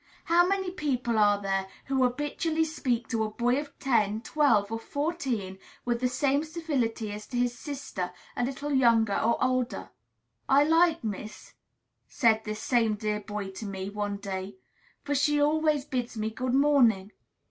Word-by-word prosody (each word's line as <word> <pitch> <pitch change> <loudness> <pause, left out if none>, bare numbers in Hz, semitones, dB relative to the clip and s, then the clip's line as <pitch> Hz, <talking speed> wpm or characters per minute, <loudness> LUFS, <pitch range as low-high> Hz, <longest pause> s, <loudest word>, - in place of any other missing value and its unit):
How 345 +1 +4
many 380 -1 0
people 250 -9 -1
are 205 -1 +4
there 195 -1 -1 0.2
who 270 -1 0
habitually 295 +5 0
speak 250 -7 -2
to 225 -3 0
a 215 - -2
boy 245 +4 +1
of 290 -1 -8
ten, 215 -5 +1
twelve, 230 -8 +2
or 225 - -2
fourteen 265 - -3 0.3
with 240 -1 0
the 250 - +3
same 275 +3 +1
civility 280 -10 -2
as 210 0 -7
to 245 - -4
his 245 0 +1
sister, 265 - -5 0.2
a - - -1
little 275 +3 -3
younger 230 -5 +4
or 230 +1 +2
older? 255 -1 -1 0.6
"I 275 +2 +6
like 325 0 +3
Miss 215 0 -6 0.3
," - - -51
said 225 -4 +2
this 215 0 -4
same 230 -4 +2
dear 210 0 -2
boy 205 -1 -5
to 205 +3 -7
me, 190 0 -5
one 205 -1 -3
day; 195 -1 -5 0.5
"for 290 - -2
she 290 +1 +2
always 300 -1 +2
bids 250 -4 -3
me 215 +1 -2
good 255 +3 -1
morning." 245 -9 +4
245 Hz, 170 wpm, -28 LUFS, 215-290 Hz, 0.6 s, I